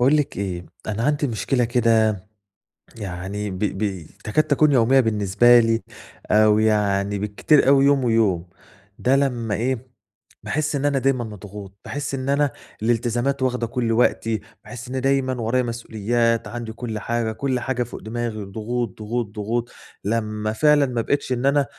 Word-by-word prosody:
باقول 135 +5 +5
لِك 150 -2 -1
إيه، 90 -3 -4 0.2
أنا 110 +1 -2
عندي 145 0 +1
مشكلة 120 +2 0
كده 115 -4 +2 0.7
يعني 100 0 -5
ب 95 - -6
ب 95 -4 -2 0.2
تكاد 130 +9 +2
تكون 150 +1 +3
يومية 130 0 +4
بالنسبة 110 +1 +4
لي، 115 0 +2 0.5
أو 105 0 +5
يعني 105 -2 +1
بالكتير 105 +9 +2
أوي 135 0 +6
يوم 140 -1 +3
ويوم، 110 -7 +2 0.5
ده 130 +2 +3
لمّا 120 -6 0
إيه 125 +1 -3 0.5
باحس 155 +1 -1
إن 140 0 -1
أنا 140 -2 +2
دايمًا 130 -2 +1
مضغوط، 100 -2 -9
باحس 145 -1 -3
إن 130 0 -4
أنا 140 0 +2 0.3
الالتزامات 120 +4 0
واخدة 125 -2 0
كُلّ 120 0 -1
وقتي، 115 -2 +1 0.2
باحس 125 0 -9
إني 130 +1 -2
دايمًا 135 0 +1
ورايا 120 +3 +1
مسؤوليات، 115 0 0
عندي 120 -2 -6
كُلّ 115 -2 -5
حاجة، 115 +1 -1
كُلّ 130 +3 -1
حاجة 125 0 -1
فوق 120 - -9
دماغي، 115 -1 -4
ضغوط، 110 +2 -4
ضغوط، 115 +2 -2
ضغوط، 115 +3 -2 0.3
لمّا 110 0 -1
فعلًا 150 +4 +4
ما 125 -3 -1
بقيتش 140 +3 -1
إن 125 +1 -2
أنا 140 0 +3
115 Hz, 155 wpm, -22 LUFS, 105-130 Hz, 0.7 s, أوي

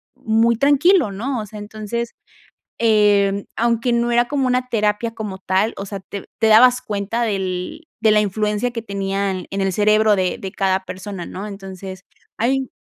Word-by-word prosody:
muy 225 +1 +2
tranquilo, 290 - +4
¿no? 240 +5 -3
O - - -6
sea, 210 +1 -10
entonces, 215 +3 -5 0.7
eh, 205 -3 +3
aunque 235 +1 +1
no 235 0 +1
era 240 0 +3
como 275 -3 0
una 250 0 0
terapia 215 0 0
como 210 -4 -6
tal, 190 +4 0
o 195 - -5
sea, 200 0 -6
te 195 +1 -8
te 225 - +3
dabas 250 +3 +6
cuenta 215 0 -2
del 195 - -3 0.2
de 220 -1 +4
la 210 - +5
influencia 210 +3 -1
que 235 -1 -4
tenían 195 -3 -2
en 195 - -3
el 190 -1 0
cerebro 215 +1 +4
de 185 -2 0
de 190 - -6
cada 190 -1 0
persona, 185 0 -7
¿no? 195 - -7
Entonces, 190 -2 -8 0.4
hay 260 +3 0
210 Hz, 175 wpm, -20 LUFS, 195-235 Hz, 0.7 s, dabas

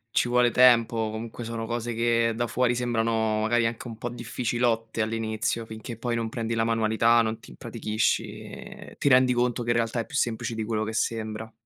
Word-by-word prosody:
ci 120 - +3
vuole 125 0 +4
tempo, 120 -2 +5
o 110 -1 -1
comunque 115 +2 -6
sono 115 0 -4
cose 120 +1 -3
che 115 0 +2
da 120 0 -1
fuori 120 +1 +1
sembrano 115 -2 0
magari 115 +2 +2
anche 115 +2 -3
un 115 - -8
po' 120 - -4
difficilotte 120 -1 -1
all'inizio, 110 +1 -1
finché 110 +1 -8
poi 120 0 -2
non 115 -1 -2
prendi 115 0 -3
la 115 - +1
manualità, 115 +1 +3
non 110 0 -1
ti - - -14
impratichisci, 105 - -2
ehm, - - -10
ti 140 - +2
rendi 125 -1 +5
conto 120 0 0
che 120 - 0
in - - +2
realtà 115 0 0
è 115 - -2
più - - -10
semplice 115 -3 -1
di 110 - -2
quello 110 0 -1
che 110 - -4
sembra. 110 -1 -2
115 Hz, 205 wpm, -26 LUFS, 110-120 Hz, -, tempo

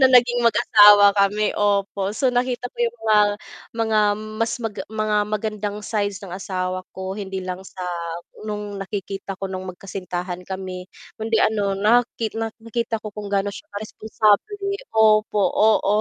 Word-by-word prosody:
na 265 - +7
naging 245 -1 +5
mag-asawa 210 -3 +7
kami, 205 +1 +2
opo. 200 -1 0
So, 260 0 +2
nakita 245 0 -1
ko - - -41
yung 470 - -17
mga 215 -1 +5 0.6
mga 220 -1 +1 0.4
mas 230 - +1
mag 225 -3 -4 0.2
mga 215 -1 -1
magandang 210 -1 -3
sides 205 -2 -1
ng 185 - -9
asawa 185 -1 -3 0.2
ko 190 0 -4
hindi 195 -2 -5
lang 185 0 -4
sa 185 -1 -7 0.6
nung 205 -1 -5
nakikita 195 0 -5
ko 195 - -6
nung 185 -1 -5
magkasintahan 180 -1 -5
kami, 185 -1 -6 0.3
kundi 225 +1 0
ano 205 -3 +1
naki 225 +1 +2
nakita 225 +1 -3
ko 215 -1 -8
kung 205 0 -7
gaano 200 0 0
siya - - -11
ka - - -11
responsable, 215 - +1 0.4
opo, 215 -1 +4
oo 210 -1 +3
210 Hz, 150 wpm, -22 LUFS, 195-220 Hz, 0.6 s, na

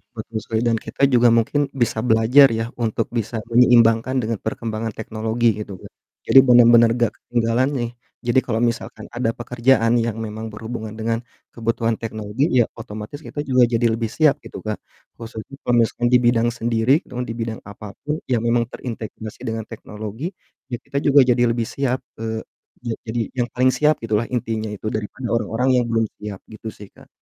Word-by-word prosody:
betul 110 0 -5
sekali. 110 0 -1
Dan 115 -1 +2
kita 140 - -5
juga 120 0 +6
mungkin 125 +5 +2
bisa 120 -3 0
belajar 120 +4 +6
ya 115 0 -1
untuk 115 -1 -1
bisa 115 -1 -2
menyeimbangkan 120 0 +5
dengan 115 -2 -2
perkembangan 110 0 -3
teknologi 110 +1 0
gitu 100 -3 -7
Kak, - - -13 0.4
jadi 135 - +8
bener-bener 120 -2 +7
enggak 120 -1 +1
ketinggalan 120 +2 0
nih. 120 -2 -2 0.3
Jadi 120 +1 +2
kalau 115 -2 -1
misalkan 115 -2 -2
ada 120 -2 0
pekerjaan 120 0 +2
yang 115 -1 0
memang 110 0 -5
berhubungan 110 0 -6
dengan 115 +1 -2 0.3
kebutuhan 115 0 0
teknologi 110 +7 -2
ya 120 -3 +4
otomatis 110 +6 -8
kita - - -7
juga 130 -1 +4
jadi 120 0 +2
lebih 115 -1 -1
siap 150 -3 +4
gitu, - - -9
Kak. 110 -1 -3 0.4
Khususnya 115 +3 -9
kalau 120 -1 +3
misalnya 120 +1 +1
di 125 - +6
bidang 120 -1 +3
sendiri 120 +4 +2
atau 125 -1 -4
di 115 - -5
bidang 115 -1 -5
apapun 105 +9 -6
yang 120 -3 0
memang 115 0 +2
terintegrasi 110 -3 -7
dengan 110 0 -2
teknologi, 110 - -7 0.4
ya 125 - -3
kita 140 - -2
juga 140 -1 +5
jadi 120 -1 +3
lebih 115 0 0
siap, 130 +2 -2 0.2
eee, 110 0 -3 0.4
ja 115 -2 -2
jadi 115 +1 -1 0.2
yang 120 - +1
paling 130 +1 +4
siap 150 +2 +3
gitulah 110 0 0
intinya 115 -3 -2
itu 105 0 -6
daripada 110 +3 -4
orang-orang 115 +3 0
yang 120 - 0
belum 115 -1 +1 0.2
siap. 105 -2 -6
Gitu 110 +1 -11
sih, 105 - -11
Kak. - - -18
115 Hz, 175 wpm, -21 LUFS, 110-120 Hz, 0.4 s, jadi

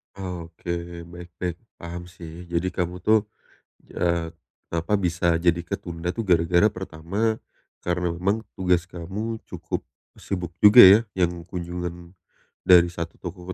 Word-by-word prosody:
Oke, 85 -2 -6
baik 85 +1 -10
baik. 90 -2 -3 0.2
Paham 85 +1 -8
sih. 85 0 -10
Jadi 85 +2 -1
kamu 90 0 -3
tuh, 110 0 +3 0.7
eee, 85 -1 0 0.4
kenapa 85 +3 -2
bisa 85 -2 +1
jadi 85 0 +2
ketunda 85 0 -5
tuh 115 - -2
gara-gara 90 +2 +3
pertama 95 +5 -2 0.5
karena 90 0 0
memang 100 +5 0 0.2
tugas 90 -2 +1
kamu 95 +7 -4
cukup - - -5 0.3
sibuk 90 -3 -5
juga 105 +4 +10
ya, 100 +2 +10
yang 85 -2 -1
kunjungan 90 0 -6 0.5
dari 85 -1 +7
satu 85 -1 -5
toko 90 0 -7
90 Hz, 130 wpm, -24 LUFS, 85-95 Hz, 0.7 s, juga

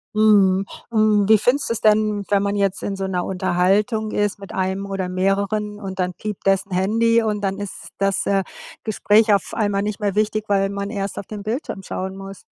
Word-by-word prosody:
Mhm. 200 -3 +4 0.3
Hm, 215 -2 +3
wie 220 -1 +6
findest 250 +6 +1
du - - +1
es 230 - -4
denn, 215 -1 +3
wenn 200 -1 +2
man 200 0 -1
jetzt 195 -1 0
in 200 - -2
so 195 0 -3
'ner 180 -2 -2
Unterhaltung 195 +4 +1
ist 205 -1 0
mit 195 -2 -10
einem 190 +1 -1
oder 195 -2 -3
mehreren 200 +3 -1
und 190 -2 -6
dann 180 -1 -1
piept 210 +2 -6
dessen 195 0 +1
Handy 230 +5 +2
und 210 -2 -1
dann 195 -1 -1
ist 205 -1 -7
das, 195 0 0
äh, 195 -1 +2 0.4
Gespräch 215 0 +3
auf 200 - -1
einmal 205 -3 0
nicht 210 +1 -3
mehr 205 -2 0
wichtig, 215 0 0
weil 195 -1 +2
man 200 0 -4
erst 200 -3 -4
auf - - -5
den 210 0 -7
Bildschirm 220 -3 -4
schauen 190 0 -5
muss? 195 0 -9
200 Hz, 205 wpm, -21 LUFS, 195-215 Hz, 0.4 s, wie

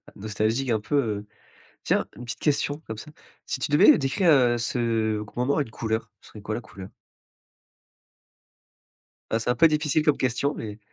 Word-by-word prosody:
nostalgique, 110 +5 -1
un 110 -2 +2
peu, 105 +8 -3 0.2
heu. 105 - -13 0.6
Tiens, - - +1
une 125 - -9
petite 120 - -5
question, 145 0 0
comme 110 -1 -5
ça: 150 - -10 0.3
si 130 - -3
tu 145 - -2
devais 150 - +7
décrire, 160 +6 +1
heu, 120 -4 +4
ce 115 -3 0
qu 105 - -15
moment 135 +4 +1
à - - +3
une 115 - -5
couleur, 110 -1 -3
ce - - -16
serait 105 - -12
quoi, 110 +1 -4
la 120 - -4
couleur? 95 -3 -11 2.4
Ah, 115 - +2
c'est 115 +2 0
un - - 0
peu 165 - +6
difficile 150 0 +1
comme 150 -2 +3
question, 130 +3 0
mais 105 -1 -7
120 Hz, 185 wpm, -25 LUFS, 110-140 Hz, 2.4 s, devais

